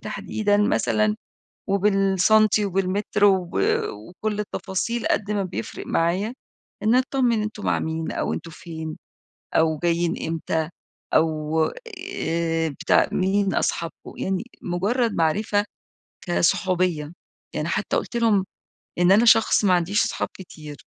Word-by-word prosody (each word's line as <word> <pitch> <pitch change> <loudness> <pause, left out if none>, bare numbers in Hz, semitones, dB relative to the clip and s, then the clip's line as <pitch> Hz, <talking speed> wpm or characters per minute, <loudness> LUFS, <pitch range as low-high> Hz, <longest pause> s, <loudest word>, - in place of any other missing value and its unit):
تحديدًا 205 -1 -1
مثلًا، 215 +1 +2 0.5
وبالسَنتي 200 +2 +3
وبالمتر 195 +2 0
وب 190 -3 +3 0.4
وكل 195 - -5
التفاصيل، 210 +3 -3
قد 210 0 0
ما 205 -1 0
بيفرِق 185 -1 -6
معايا 185 +8 0 0.5
إني 225 +4 +4
أتطمن 255 -4 +1
أنتم 215 -1 -5
مع - - +2
مين 160 0 -3
أو - - -2
أنتم 165 - -5
فين 160 -1 -7 0.6
أو 160 -1 +2
جايين 170 0 +1
إمتى، 160 -1 -2 0.4
أو 155 0 +1 0.6
آآ، 165 -1 0
بتاع 140 - +2
مين 195 +1 +1
أصحابكم؟" 165 -1 -3
يعني 190 +2 -1 0.2
مجرد 210 +7 0
معرِفة 205 +6 +1 0.6
كصحوبية 175 -3 +1 0.4
يعني، - - -2
حتى - - -1
قلت - - -3
لهم 220 -5 +3 0.5
إن 175 +1 +5
أنا 215 +4 +5
شخص 225 -2 +5
ما 185 -2 +5
عنديش 180 +5 +2
صحاب - - -2
كتير، 155 -5 -10
190 Hz, 120 wpm, -23 LUFS, 165-210 Hz, 0.6 s, إن